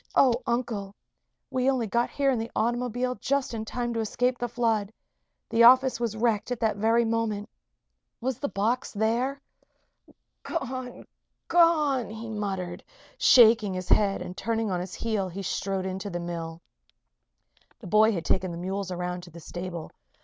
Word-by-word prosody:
"Oh, 260 -3 +6
Uncle! 230 -5 -2 0.6
We 260 +1 +2
only 255 -4 +1
got 235 +3 0
here 275 -1 +1
in 250 - 0
the 225 +1 -4
automobile 245 +2 0
just 280 -2 0
in 220 -1 -4
time 240 +1 -3
to 230 - -2
escape 245 +3 0
the 245 - -1
flood. 225 -4 0 0.6
The 230 - +1
office 255 +1 +7
was 230 -2 -2
wrecked 225 -2 +1
at 245 - -2
that 220 -3 +1
very 225 +3 +3
moment. 225 -2 -1 0.7
Was 255 0 -2
the 285 - -2
box 230 +6 -1
there?" 235 +6 0 1.0
"Gone! 255 -6 -5 0.4
Gone!" 305 -8 +3
he 220 +1 -7
murmured, 190 -4 -4 0.4
shaking 225 -5 +6
his 185 0 -5
head; 200 -2 +3
and 180 - -8
turning 225 0 -1
on 180 - 0
his 180 0 -6
heel, 215 -5 -1
he 195 +3 -6
strode 190 +1 -2
into 190 +2 -4
the 175 -2 -4
mill. 170 -1 -6 1.1
The 225 - -13
boy 215 +4 +5
had 175 -6 -3
taken 185 0 +1
the 170 - -6
mules 190 +2 -3
around 180 0 -3
to 175 - -12
the 170 0 -11
stable. 175 0 -6
220 Hz, 165 wpm, -27 LUFS, 190-245 Hz, 1.1 s, office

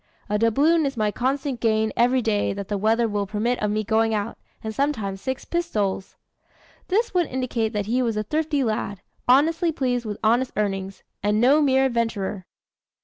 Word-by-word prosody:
A 210 0 +1
doubloon 285 +8 +3
is 270 -2 -5
my 215 -1 +1
constant 265 +2 -1
gain 220 -2 +1
every 250 +1 +3
day 210 -3 +1
that 200 -1 -6
the 205 - -1
weather 225 +3 +2
will 205 -2 -2
permit 220 +5 -1
of 210 - +1
my 215 +1 0
going 220 +1 +2
out, 210 +2 -3 0.3
and 220 0 -4
sometimes 215 -8 -1
six 260 -1 -4
pistoles." 210 - -2 0.7
This 440 +4 +1
would 350 -3 +2
indicate 245 -4 -1
that 205 -1 -1
he 240 +5 +1
was 230 -3 0
a 215 - 0
thrifty 300 +3 0
lad, 210 -4 -2 0.3
honestly 325 +6 +4
pleased 250 -5 -1
with 210 - -4
honest 240 +4 +2
earnings 195 -2 -2 0.2
and 210 +1 +1
no 275 +6 +5
mere 265 -2 +3
adventurer. 225 -6 -2
230 Hz, 180 wpm, -24 LUFS, 210-265 Hz, 0.7 s, no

